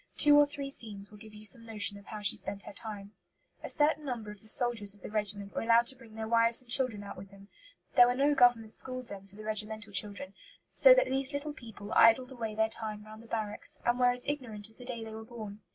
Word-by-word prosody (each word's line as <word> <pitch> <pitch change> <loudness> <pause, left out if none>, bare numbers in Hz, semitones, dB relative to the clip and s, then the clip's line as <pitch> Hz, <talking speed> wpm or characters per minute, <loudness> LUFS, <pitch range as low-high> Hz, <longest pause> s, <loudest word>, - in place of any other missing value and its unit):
Two 295 -1 +8
or 290 0 +6
three 280 -1 -5
scenes 205 -6 -1
will 210 - -15
give 215 0 -14
you 210 0 -12
some 230 +2 +3
notion 210 -3 +2
of 200 0 -14
how 215 -2 -8
she 205 - +5
spent 200 0 -6
her - - -11
time. 205 -2 -8 0.5
A - - -6
certain 300 +1 +1
number 235 -6 -6
of 210 - -13
the 220 - -15
soldiers 220 -4 +2
of 205 - -20
the - - -8
regiment 205 -1 -4
were - - -3
allowed 230 +1 +3
to 265 - +1
bring 230 -4 -17
their 220 0 -5
wives 230 0 +6
and 250 -2 -11
children 250 -6 +2
out 200 - -9
with 190 +1 -11
them. 200 +1 -17 0.5
There 245 - +7
were 245 - 0
no 280 +3 +2
Government 240 -5 +3
schools 255 -2 -3
then 195 -1 -10
for 200 - -20
the 215 - -11
regimental 215 -1 -1
children, 200 -1 -3 0.4
so - - +7
that - - +3
these 270 - 0
little 290 +1 -4
people 220 -5 -10
idled 250 +3 +4
away 225 -4 -6
their 220 0 +1
time 215 -1 -6
round 215 +1 -12
the 230 - -16
barracks, 215 -2 -1
and 240 +1 +1
were 250 0 +4
as 245 0 -1
ignorant 225 -7 -5
as 220 - -21
the 250 - -12
day 240 -3 -2
they 220 -1 -9
were 220 0 -8
born. 220 -3 -10
220 Hz, 255 wpm, -30 LUFS, 210-245 Hz, 0.5 s, Two